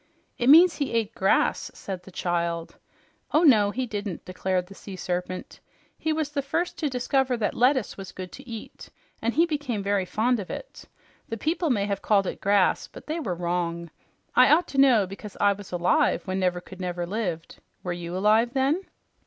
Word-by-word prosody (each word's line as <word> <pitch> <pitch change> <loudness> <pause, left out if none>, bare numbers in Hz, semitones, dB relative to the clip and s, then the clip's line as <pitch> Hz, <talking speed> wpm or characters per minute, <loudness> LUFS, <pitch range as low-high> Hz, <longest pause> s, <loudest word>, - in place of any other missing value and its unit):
"It 245 - +2
means 335 +4 +8
he 285 -5 -2
ate 225 -1 0
grass," 190 -3 +1
said 190 -2 -6
the 180 - -14
child. 170 -2 -2 0.6
"Oh 310 - +4
no, 215 -10 +6
he 255 +5 -2
didn't," 205 -5 -5
declared 185 0 -1
the 195 - -13
Sea 195 0 -9
Serpent. 180 0 -4 0.4
"He 315 - -2
was 310 -2 -1
the 285 -1 -1
first 340 +6 -2
to 305 - 0
discover 255 0 0
that 215 - -1
lettuce 255 -1 +2
was 190 -2 -8
good 185 -1 -8
to 270 -1 -12
eat, 225 -2 -9 0.3
and 230 +1 -1
he 330 +3 +5
became 290 -10 -3
very 200 -1 +1
fond 235 +5 +1
of 195 - -6
it. - - -8 0.4
The 225 - -3
people 325 - 0
may 205 -6 +1
have 200 -1 -2
called 200 -2 +3
it - - -5
grass, 200 -1 +2
but - - -13
they 315 +2 -3
were 195 - -2
wrong. 170 -1 -2 0.4
I 255 +2 +7
ought 335 +4 +4
to 275 - -1
know, 245 -7 +5
because 195 +2 -9
I 205 0 +4
was 200 -1 -11
alive 180 - +2
when 190 -1 -2
Nevercouldnever 180 -1 -2
lived. 180 -5 -4 0.2
Were 180 - -2
you 175 +1 -5
alive, 220 +5 +3
then?" 275 +7 +2
205 Hz, 190 wpm, -26 LUFS, 185-265 Hz, 0.6 s, means